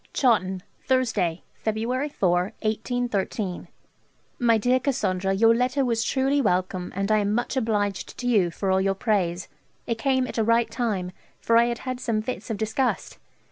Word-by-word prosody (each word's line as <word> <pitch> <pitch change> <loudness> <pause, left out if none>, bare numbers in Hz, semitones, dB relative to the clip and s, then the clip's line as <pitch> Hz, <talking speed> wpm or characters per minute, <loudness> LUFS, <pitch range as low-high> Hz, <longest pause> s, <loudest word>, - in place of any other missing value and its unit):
Chawton, 190 -8 +2 0.2
Thursday, 225 -10 +1
February 235 +6 -2
4 180 -3 +1
(1813). 215 -4 -2 0.7
'MY 230 -2 +4
DEAR 245 +4 +2
CASSANDRA, 195 -9 0
Your 225 +3 +5
letter 255 +3 +1
was 230 -2 +1
truly 270 +4 +1
welcome, 185 -4 0
and 195 +2 -1
I 215 - +4
am 205 0 0
much 240 +3 -1
obliged 210 -5 -1
to 245 - -6
you 205 -8 +3
for 190 +3 -2
all 190 0 +3
your 195 0 +1
praise; 190 -5 0 0.4
it 230 -1 -2
came 260 +1 +2
at 245 - -4
a - - +3
right 230 0 +2
time, 210 -7 -2 0.3
for 230 - +1
I 235 +1 +6
had 240 0 -1
had 255 -1 -3
some 225 -4 -1
fits 255 +1 -5
of 220 - -2
disgust. 220 +4 -1
225 Hz, 170 wpm, -25 LUFS, 195-245 Hz, 0.7 s, I